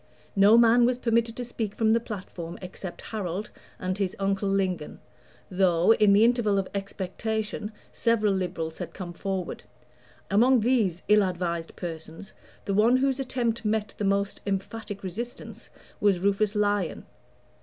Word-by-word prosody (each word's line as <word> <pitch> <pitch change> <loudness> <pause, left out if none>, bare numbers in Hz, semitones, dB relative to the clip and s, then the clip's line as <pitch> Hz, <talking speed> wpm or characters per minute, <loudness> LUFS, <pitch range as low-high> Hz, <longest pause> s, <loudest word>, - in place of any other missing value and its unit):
No 205 +3 +7
man 235 +1 +6
was 245 +1 +3
permitted 230 -1 +1
to 245 - -3
speak 225 -3 -4
from 220 -1 +2
the 230 - +4
platform 185 -6 -7
except 185 0 -8
Harold 200 -1 -4 0.3
and 185 +2 -3
his 190 -2 -1
uncle 195 0 0
Lingon, 190 -5 -1 0.5
though, 180 +1 +4
in 210 -2 +4
the 205 +3 +6
interval 230 -4 +2
of 195 -1 0
expectation, 210 +2 -3 0.2
several 215 -3 +2
Liberals 170 -4 -3
had - - -6
come 180 -3 -6
forward. 190 -1 -4 0.7
Among 240 +4 +5
these 215 -7 +1
ill 210 +1 +6
advised 175 -3 -2
persons 165 +2 -7 0.3
the 200 - -1
one 225 +5 +4
whose 270 0 +1
attempt 240 -3 -1
met 215 -1 -1
the - - -1
most 200 0 0
emphatic 200 +1 -4
resistance 230 +7 -6 0.3
was 200 -3 +3
Rufus 200 +3 +1
Lyon. 205 -3 0
200 Hz, 145 wpm, -27 LUFS, 185-225 Hz, 0.7 s, No